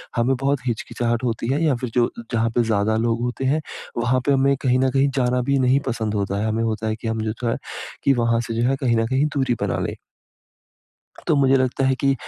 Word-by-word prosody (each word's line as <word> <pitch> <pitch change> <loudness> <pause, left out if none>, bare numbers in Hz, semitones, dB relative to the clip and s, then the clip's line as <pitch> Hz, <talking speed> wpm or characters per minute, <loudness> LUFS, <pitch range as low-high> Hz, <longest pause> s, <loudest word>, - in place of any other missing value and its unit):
हमें 125 +2 +2
बहुत 140 +2 0
हिचकिचाहट 120 0 -2
होती 115 -2 -2
है 145 - 0
या 150 -5 +3
फिर 125 0 -4
जो 120 -1 +3 0.2
जहाँ 115 -1 +1
पे 120 - +3
ज़्यादा 110 -1 +1
लोग 115 +1 0
होते 125 +2 -2
हैं 150 +4 +2 0.4
वहाँ 120 +2 +2
पे 145 - +3
हमें 140 0 +3
कहीं 130 -2 +2
न 130 0 +3
कहीं 135 +1 +3
जाना 125 -1 +1
भी 140 - +3
नहीं 130 +1 +3
पसंद 110 -3 -2
होता 100 -1 -1
है। 110 - 0
हमें 110 +1 0
होता 110 -1 -2
है 110 - -1
कि, 115 +1 -7
हम 110 0 -1
जो 110 +2 -3
है - - 0 0.5
की 140 - +4
वहाँ 115 -2 +1
से 115 - -3
जो 120 - +2
है 135 - +2
कहीं 120 -3 +2
न 115 - +2
कहीं 130 +4 +1
दूरी 135 -3 +1
बना - - 0
लें। - - -5 1.3
तो - - +3
मुझे 135 -1 +4
लगता 130 +1 0
है 130 0 +2
कि 135 0 +4
125 Hz, 240 wpm, -22 LUFS, 115-135 Hz, 1.3 s, की